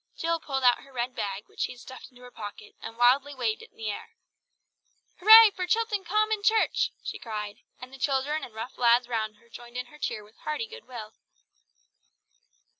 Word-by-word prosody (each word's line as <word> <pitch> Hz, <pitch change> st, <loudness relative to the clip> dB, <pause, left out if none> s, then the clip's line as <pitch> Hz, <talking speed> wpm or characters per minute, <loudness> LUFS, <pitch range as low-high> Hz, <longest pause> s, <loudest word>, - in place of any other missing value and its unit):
Jill 330 Hz, 0 st, 0 dB
pulled 270 Hz, -4 st, -3 dB
out 245 Hz, -1 st, +5 dB
her 275 Hz, -, -17 dB
red 250 Hz, 0 st, -3 dB
bag 200 Hz, -2 st, -4 dB
which -, -, -19 dB
she -, -, -1 dB
had 245 Hz, -, -16 dB
stuffed 260 Hz, 0 st, -11 dB
into 250 Hz, -1 st, -18 dB
her 250 Hz, -, -12 dB
pocket, 210 Hz, -2 st, -9 dB
and 225 Hz, -, -8 dB
wildly 265 Hz, +4 st, +4 dB
waved 230 Hz, -4 st, -1 dB
it -, -, -13 dB
in -, -, -34 dB
the 220 Hz, -2 st, -3 dB
air. -, -, -9 dB, 1.0 s
"Hurray 440 Hz, +3 st, +10 dB
for 365 Hz, -2 st, -4 dB
Chilton 440 Hz, 0 st, 0 dB
Common 430 Hz, +3 st, +1 dB
Church!" 440 Hz, +1 st, +2 dB
she -, -, -5 dB
cried, 210 Hz, -2 st, -5 dB, 0.2 s
and 255 Hz, +1 st, -11 dB
the 270 Hz, -, -11 dB
children 280 Hz, +3 st, 0 dB
and 230 Hz, -, -9 dB
rough 225 Hz, +3 st, -7 dB
lads 240 Hz, 0 st, +4 dB
round 220 Hz, -3 st, -2 dB, 0.2 s
joined 240 Hz, +1 st, -10 dB
in 250 Hz, -, -3 dB
her 300 Hz, -, -15 dB
cheer 215 Hz, -, -3 dB
with 210 Hz, +1 st, -21 dB
a -, -, -25 dB
hearty 305 Hz, +9 st, -3 dB
good 465 Hz, +1 st, -12 dB
will. 220 Hz, -4 st, -9 dB
255 Hz, 200 wpm, -27 LUFS, 230-330 Hz, 1.0 s, Hurray